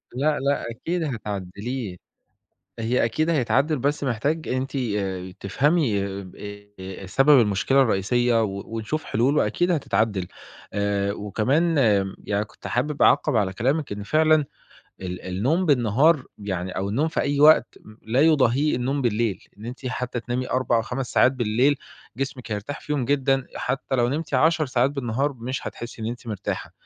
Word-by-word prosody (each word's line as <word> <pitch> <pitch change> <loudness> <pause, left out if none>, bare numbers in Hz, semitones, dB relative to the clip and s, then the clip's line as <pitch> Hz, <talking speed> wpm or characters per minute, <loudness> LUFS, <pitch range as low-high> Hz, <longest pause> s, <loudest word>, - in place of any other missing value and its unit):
لأ، 150 +3 +1
لأ، 140 -3 0
أكيد 165 +8 -3
هتعدّليه، 105 - -4 0.8
هي 115 +1 +1
أكيد 155 +8 0
هيتعدّل 145 +1 +2
بس 145 +3 0
محتاج 140 +6 -1
أنتِ 130 +2 -2
آآ 105 -7 -1
ي 90 0 -8
تفهمي 115 - +1 0.2
ب 90 - -13
إيه 100 -2 -9
سبب 135 +7 +5
المشكلة 105 +6 +2
الرئيسية 115 +1 +2
و 100 -1 -3
ونشوف 115 +8 -4
حلول 130 +7 +1
وأكيد 175 +1 +1
هتتعدّل، 105 - 0 0.5
آآ 100 -1 0
وكمان 130 - 0 0.3
م 95 - -7
يعني 105 +1 -1
كنت - - -11
حابِب 145 +4 -1
أعقّب 145 -5 +4
على 95 -3 +1
كلامِك 135 +5 0
إن 100 0 -4
فعلًا 155 +3 +3 0.6
ال 90 -1 -5
النوم 130 - 0
بالنهار 135 +3 +3 0.2
يعني 95 -3 -4
أو 95 +1 -1
النوم 145 +10 +1
في 165 - -1
أي 145 0 0
وقت 155 -4 +5
م 110 0 -14
لا 115 +5 +1
يضاهيه 145 -3 +3
النوم 135 +3 -1
بالليل، 115 -3 0
إن 110 - -9
أنتِ 125 +2 -7
حتى 125 -1 -3
تنامي 125 +1 -3
4 130 -2 +1
أو 115 - +2
5 125 +2 -4
ساعات 130 - +5
بالليل 125 +3 +2 0.4
جسمِك 135 -4 -4
هيرتاح 105 +8 -5
فيهم 145 -4 -2
جدًا 135 0 +2 0.2
أ - - -5
حتى 135 +1 -2
لو 120 -1 +2
نمتي 145 -1 -1
10 155 +2 +3
ساعات 130 +1 +2
بالنهار، 135 +1 -1
مش 125 +1 -5
هتحسّي 120 -1 -7
إن - - -2
أنتِ 120 0 -7
مرتاحة 105 -3 -4
125 Hz, 165 wpm, -24 LUFS, 105-145 Hz, 0.8 s, سبب